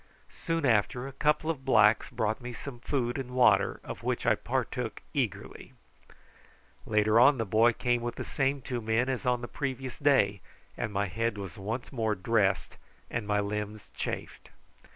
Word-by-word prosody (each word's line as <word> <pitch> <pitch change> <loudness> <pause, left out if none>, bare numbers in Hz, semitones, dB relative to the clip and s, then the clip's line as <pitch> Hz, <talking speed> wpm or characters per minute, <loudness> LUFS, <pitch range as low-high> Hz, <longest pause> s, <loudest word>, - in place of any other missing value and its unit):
Soon 165 -2 -1
after 125 +2 +2
a - - -7
couple 150 +3 +1
of 140 -5 -8
blacks 110 -4 +4
brought 110 +1 -1
me 125 0 -6
some 120 +1 -8
food 125 0 -1
and 125 -1 -6
water, 110 -6 +4
of - - -7
which - - -2
I - - +5
partook - - -3
eagerly. - - -3 1.1
Later 105 +1 +3
on 130 +3 +6
the 115 - -1
boy 110 +4 +4
came 120 +1 0
with 120 0 -3
the - - -5
same 135 -1 -1
two 125 -2 -3
men 110 +4 +1
as 130 -1 -2
on 125 -1 +2
the 120 - -5
previous 130 -1 -4
day, 115 -10 +3 0.3
and 110 - -3
my 100 0 0
head 115 +3 -2
was 95 -5 -6
once 110 +6 -5
more 110 -4 0
dressed 100 0 +1 0.3
and 115 -3 -3
my 105 0 +2
limbs 105 +1 -4
chafed. - - -5
120 Hz, 175 wpm, -29 LUFS, 105-130 Hz, 1.1 s, on